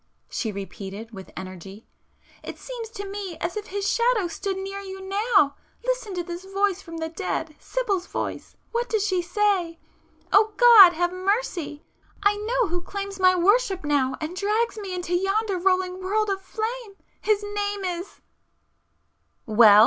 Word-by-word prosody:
she 225 - -2
repeated 200 +2 -7
with 190 -3 -10
energy—"It 190 +3 -11
seems 480 -3 -7
to 405 -3 -7
me 390 -3 -5
as 340 +4 -3
if 420 -1 -4
his 400 0 -2
Shadow 470 -5 +2
stood 380 +3 -3
near 390 +1 -5
you 385 -1 -7
now! 395 - +3 0.3
Listen - - -1
to 350 - -1
this 345 +1 -6
voice 390 0 0
from 330 -1 -9
the 320 0 -2
dead—Sibyl's 370 +4 -2
voice!——what 475 +1 -4
does 430 -3 +1
she 375 -3 +1
say?——'Oh 400 +2 0
God, 450 -7 +10
have 350 +2 0
mercy!——I 380 -1 -2
know 455 +2 0
who 350 +1 -1
claims 395 +1 -5
my 370 0 +6
worship 390 +1 +3
now 280 -3 +1
and 315 +3 -4
drags 425 +5 +1
me 395 -4 -5
into 355 -1 -3
yonder 390 +1 +1
rolling 370 0 +1
world 415 +2 +1
of 390 0 -2
flame... 440 +2 -4 0.3
his 420 -1 +2
name 410 -1 -2
is—'"... 360 +2 -5 1.2
"Well!" 215 -1 +7
385 Hz, 145 wpm, -25 LUFS, 345-415 Hz, 1.2 s, God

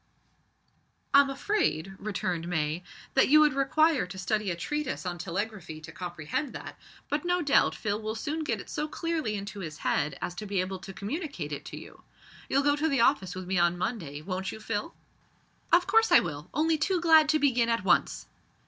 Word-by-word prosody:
"I'm 280 0 +7
afraid," 275 - 0
returned 180 -5 -2
May, 160 -1 -1 0.3
"that 265 - +4
you 305 +2 +7
would 300 -2 +5
require 275 - +2
to 185 +1 -9
study 205 +2 -1
a 175 - -1
treatise 295 - -3
on 175 -1 -3
Telegraphy 175 -2 -4
to 160 +1 -10
comprehend 175 - -4
that, - - -8 0.3
but 295 +1 -1
no 355 0 +1
doubt 285 - +3
Phil 210 0 -2
will 215 0 -3
soon 305 +7 -3
get - - -1
it - - -9
so 300 - -3
clearly 315 -8 -2
into 200 0 -6
his 155 -5 -6
head 150 - 0
as 175 - -3
to 210 +4 -7
be 200 -1 -1
able 185 +1 -2
to 195 - -9
communicate 200 - -5
it 145 - -5
to - - -7
you. - - -12 0.5
You'll 275 +1 +2
go 290 0 +3
to 310 +2 0
the 275 -4 +2
office 195 -9 +2
with 185 0 -6
me 185 0 0
on 175 0 +3
Monday, 175 - -4
won't 190 +1 -3
you, - - -8
Phil?" 215 +6 -4 0.8
"Of 350 +1 +5
course 450 +1 +3
I 345 - +9
will 150 -3 -5
only 315 +2 +1
too 365 +4 +1
glad 320 -3 +6
to 310 - +4
begin 250 -5 +2
at 230 -2 +1
once." - - +2
215 Hz, 200 wpm, -28 LUFS, 180-300 Hz, 0.8 s, I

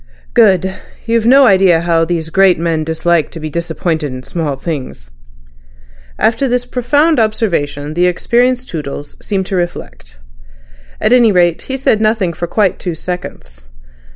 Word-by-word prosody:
"Good. 190 -5 +3 0.3
You've 230 -1 +1
no 270 +2 +6
idea 190 -6 +4
how 165 -1 +1
these 165 -1 -3
great 190 -1 +4
men 165 -1 -1
dislike 160 0 0
to 165 - -9
be 155 -1 -6
disappointed 160 -2 -2
in 130 0 -8
small 155 -1 -3
things." 135 - -6 1.1
After 230 +4 +1
this 245 0 -1
profound 285 +5 +1
observation 160 -10 -1
the 175 +2 +2
experienced 245 +7 +1
Toodles 145 -2 -6
seemed 195 -2 -2
to 190 - -4
reflect. 175 - -5 0.8
At 240 - +2
any 240 -3 +5
rate 175 -3 +2
he 265 - -2
said 225 -5 +1
nothing 215 -5 +1
for 175 - -4
quite 200 -2 0
two 175 -3 -4
seconds. - - -8
175 Hz, 150 wpm, -14 LUFS, 160-225 Hz, 1.1 s, no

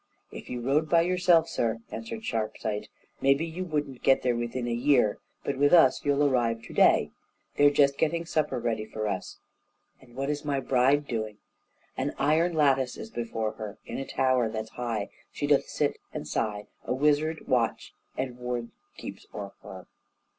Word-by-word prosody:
"If - - -9
you 125 -1 -4
rode 145 +5 +1
by 170 -1 +5
yourself, 175 -2 +3
sir," 115 -6 -1
answered 115 - -6
Sharpsight, 110 -1 -2 0.3
"maybe 140 +4 +3
you 165 +3 -5
wouldn't 145 -6 -3
get 135 - +4
there 125 -1 +2
within 120 +1 -3
a 120 - -1
year; 120 -3 +3 0.2
but 140 -1 -2
with 145 +2 +4
us 165 -7 +6
you'll 145 0 +3
arrive 115 -4 +1
to - - -10
day - - +4 0.4
they're 145 0 +6
just 140 -1 +3
getting 165 +1 +1
supper 150 -5 0
ready 115 -2 -1
for 110 0 -4
us." 95 -3 -4 0.6
"And 120 -2 -18
what 135 +2 -1
is 145 0 -4
my 145 -2 0
bride 135 +3 +3
doing?" 110 -4 -3 0.6
"An 135 +2 -2
iron 155 +5 +2
lattice 135 -4 +2
is 225 - -8
before 115 -2 -2
her, 110 -2 -6
In - - -5
a 135 - -4
tower 130 -3 +2
that's 110 0 -5
high 115 -4 -3 0.2
She - - -3
doth - - +3
sit - - 0
and - - -6
sigh, 105 -2 -2 0.2
A - - -1
wizard 150 +3 +1
watch 120 -4 0 0.2
and 125 -2 -3
ward 125 -1 -3 0.3
keeps - - -9
o'er 100 -1 -6
her." 95 -1 -10
130 Hz, 175 wpm, -28 LUFS, 115-145 Hz, 0.6 s, us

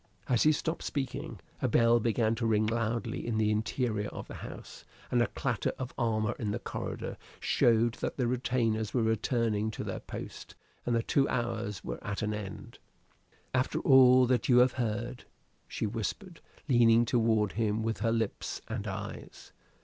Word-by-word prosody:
As 125 -2 +2
he 155 - +6
stopped 160 +2 -2
speaking, 135 -3 -4 0.2
a - - +2
bell 115 0 +4
began 115 0 +1
to 115 0 -1
ring 110 -1 +3
loudly 115 +1 -1
in 115 -2 0
the 110 -1 +2
interior 110 0 -1
of - - -8
the - - -9
house; - - -9 0.3
and 120 - +3
a 120 - +3
clatter 120 -7 -2
of 130 -1 -5
armor 110 -3 0
in 110 - -2
the 105 - -1
corridor - - -5 0.2
showed 115 0 +3
that - - -2
the 125 - +1
retainers 120 -3 0
were 120 - +3
returning 110 -1 +1
to 110 - -5
their - - -4
post, - - -8 0.3
and 120 - +2
the 115 - +1
two 140 +3 +2
hours 115 -5 -2
were - - -6
at 100 +2 -3
an 105 0 -1
end. 105 -2 -7 0.7
"After 130 0 +1
all 130 -1 +7
that 125 +3 +1
you 125 - +6
have 125 +1 +6
heard?" 120 +1 -3 0.4
she - - -3
whispered, 120 - -4 0.3
leaning 120 -3 +5
toward 110 -3 +2
him 110 0 0
with 115 0 -2
her 115 - +1
lips 115 -2 -2
and - - -4
eyes. - - -7
115 Hz, 170 wpm, -30 LUFS, 110-125 Hz, 0.7 s, all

